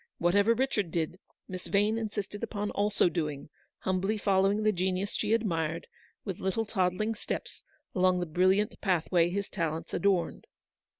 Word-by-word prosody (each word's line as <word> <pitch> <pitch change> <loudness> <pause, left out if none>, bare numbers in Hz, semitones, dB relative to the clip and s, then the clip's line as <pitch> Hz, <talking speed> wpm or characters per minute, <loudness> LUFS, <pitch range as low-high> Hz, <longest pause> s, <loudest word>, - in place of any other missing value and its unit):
Whatever 200 +6 +3
Kichard 225 -7 0
did, 165 +2 -2 0.3
Miss 185 -1 -7
Vane 210 +2 +2
insisted 205 -2 -4
upon 210 -2 -3
also 205 -2 +2
doing, 150 -4 -3 0.3
humbly 190 +3 0
follow 195 -1 +3
ing 210 +2 0
the 215 - +4
genius 185 +1 -1
she 210 - -1
admired, 170 -8 0 0.4
with 190 -4 -4
little 190 +4 0
toddling 205 +2 0
steps, 215 - -5 0.3
along 185 -1 +3
the 175 - -1
brilliant 185 +5 +2
pathway 175 -2 +2
his 200 +2 -2
talents 165 -2 -3
adorned. 195 -3 0
190 Hz, 145 wpm, -30 LUFS, 175-210 Hz, 0.4 s, the